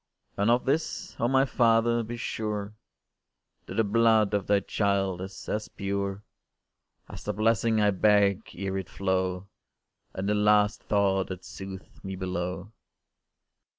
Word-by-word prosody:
And 100 +3 +1
of 120 +1 +3
this, 150 +4 -1
oh, 120 - +2
my 135 +1 +4
Father! 115 -2 +3
be 115 +1 -6
sure 105 -3 -3 0.9
That - - -7
the 115 - +3
blood 110 -1 +3
of 100 -2 0
thy 100 -1 +3
child 95 -2 0
is 95 +1 -8
as 105 0 -2
pure 100 0 -3 0.8
As - - -10
the - - -2
blessing 110 +1 +2
I 105 -1 +4
beg 100 +1 +3
ere 95 0 -2
it 95 - -7
flow, 95 -1 -1 0.7
And 95 +1 -3
the 105 - +2
last 105 0 +3
thought 95 -2 +1
that 95 -1 -7
soothes 95 0 -10
me 95 0 -5
below. 90 +1 -4
100 Hz, 145 wpm, -27 LUFS, 95-110 Hz, 0.9 s, my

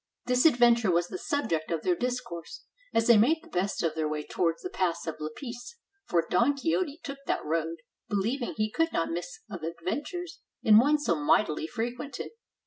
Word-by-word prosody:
This 250 +4 +5
adventure 240 -6 +4
was 175 0 +2
the 185 - -5
subject 170 - -1
of 165 -2 -2
their 180 - +2
discourse, 245 -8 -4 0.3
as 225 - +2
they 235 -2 +7
made 315 +9 +3
the - - -15
best 185 +1 -1
of 165 -2 +1
their 155 -1 -1
way 150 0 -2
towards 165 +1 -1
the 365 - -4
pass 170 -3 -1
of 160 - -5
Lapice; 240 - -7 0.3
for 170 -2 +2
Don 270 +4 +3
Quixote 320 +1 -1
took 275 -1 -6
that - - -1
road, 165 +1 -1 0.3
believing 230 +6 -1
he 215 0 0
could 325 +6 +1
not 165 - 0
miss 175 +1 -5
of 190 -6 -7
adventures 290 - -4 0.2
in 215 -1 +8
one 290 +5 +4
so 295 - +1
mightily 155 +1 +2
fre 225 +4 -3
quented. 250 +2 -7
215 Hz, 190 wpm, -28 LUFS, 170-265 Hz, 0.3 s, in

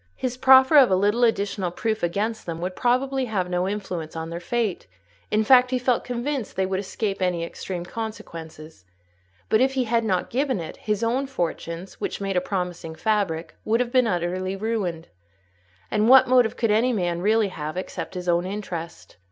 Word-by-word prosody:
His 250 -1 -3
proffer 265 +3 +6
of 265 -4 +8
a 190 - +4
little 205 +5 +2
additional 200 -4 +1
proof 220 +5 -2
against 205 +6 -2
them 165 -1 -4
would 180 +2 -4
probably 260 +2 +1
have 190 -6 -2
no 180 +1 0
influence 185 -6 -5
on 160 0 -5
their 170 - -4
fate; 215 - -2 0.4
in 215 +1 +2
fact, 250 +2 +6
he 255 - +1
felt 250 -1 +1
convinced 250 0 -3
they 190 - +1
would 190 0 -1
escape 195 0 -3
any 180 -2 0
extreme 175 +1 -5
consequences; 165 - -8 0.6
but 220 - +3
if 265 +1 +3
he 260 -1 +1
had 230 0 +1
not 185 -5 -1
given 260 -3 0
it, 165 - -6
his 210 +1 -2
own 255 +4 0
fortunes, 175 -5 -4
which - - -3
made 195 -1 -2
a 180 - +3
promising 180 -4 -4
fabric, 180 -6 -1
would 225 +2 +1
have 245 -1 -1
been 255 -2 +3
utterly 185 0 -1
ruined. 195 -6 -3 0.8
And 215 +2 +2
what 265 0 +8
motive 245 -3 +3
could 230 -2 +1
any 235 +4 +3
man 175 -4 -1
really 215 +1 +2
have, 155 -1 -6
except 185 +1 -5
his 180 0 -5
own 175 0 +2
interest? 185 -4 -6
205 Hz, 185 wpm, -24 LUFS, 180-235 Hz, 0.8 s, of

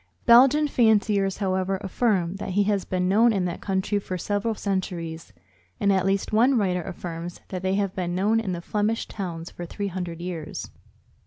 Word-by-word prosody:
Belgian 270 +6 +6
fanciers, 210 -6 +2
however, 190 -1 0
affirm 195 -3 0
that 195 -1 -5
he 205 - +5
has 200 -2 0
been 180 -1 -1
known 225 +5 +5
in 195 -4 0
that 175 - -4
country 195 +1 0
for 185 -2 -5
several 205 +5 -1
centuries; 170 - -3 0.5
and 200 -1 +3
at 190 0 +1
least 195 +2 0
one 245 +4 +4
writer 185 -4 +1
affirms 175 -2 -6
that 185 -2 -4
they 190 0 0
have 200 -2 0
been 175 -2 -2
known 210 +5 +2
in 210 -4 -3
the 175 -1 -4
Flemish 210 +4 -1
towns 175 -4 -6
for 175 - -8
three 200 +3 -4
hundred 175 -2 -5
years. 170 -3 -6
195 Hz, 180 wpm, -25 LUFS, 180-210 Hz, 0.5 s, Belgian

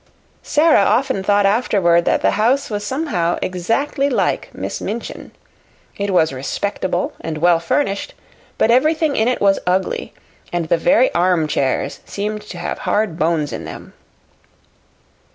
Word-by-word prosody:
Sara 305 -2 +3
often 255 0 +1
thought 205 +1 +2
afterward 195 -6 +2
that - - +1
the - - +4
house 250 +5 +1
was 205 -1 -3
somehow 210 - -1
exactly 250 - -1
like 255 - 0
Miss - - -5
Minchin. - - -6 0.6
It 200 0 -3
was 160 -6 +2
respectable 180 +6 -2
and 160 -1 -4
well 170 +1 +3
furnished, 195 +4 -1 0.4
but 225 - +3
everything 305 +3 +2
in 220 - +2
it 250 - 0
was 195 -1 +3
ugly; 185 +1 -1 0.4
and 170 -2 -2
the - - +3
very 260 - +3
armchairs 160 -6 0
seemed 210 +1 -4
to - - -7
have - - -4
hard 205 -6 -1
bones 160 -3 0
in - - -5
them. - - -10
200 Hz, 140 wpm, -19 LUFS, 170-250 Hz, 0.6 s, the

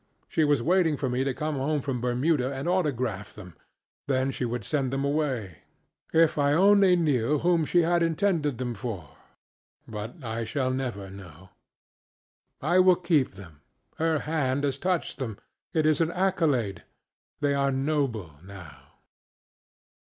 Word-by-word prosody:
She 160 - +1
was 145 -5 +2
waiting 170 -2 +2
for 135 -2 -2
me 125 +2 0
to 135 - 0
come 150 +2 -3
home 145 +3 0
from 130 -4 -3
Bermuda 125 +2 +1
and 135 +3 -4
autograph 130 - -1
them, 90 -5 -11 0.5
then 135 -1 +1
she 125 - -3
would 120 -1 -3
send 135 +4 0
them 135 +1 -1
away. 135 - -2 0.5
If 160 -2 +3
I 145 0 +3
only 195 +2 +5
knew 150 -5 +1
whom 170 +1 +2
she 175 +3 +3
intended 165 - +1
them 125 -1 -3
for! 100 - -6 0.8
But 110 +7 -7
I 115 0 -3
shall 130 +3 -1
never 120 -7 -4
know. 95 -2 -12 1.1
I 175 +5 +3
will 185 0 +6
keep 170 - +1
them. 85 -7 -13 0.4
Her 160 0 +1
hand 145 -3 -1
has 140 -1 -1
touched 180 -2 -1
themŌĆöit 115 -6 -4 0.5
is 155 0 +3
an 165 - +2
accoladeŌĆöthey 165 - 0 0.8
are 140 0 +2
noble, 130 - -2
now. 95 -5 -13
135 Hz, 145 wpm, -27 LUFS, 115-160 Hz, 1.1 s, will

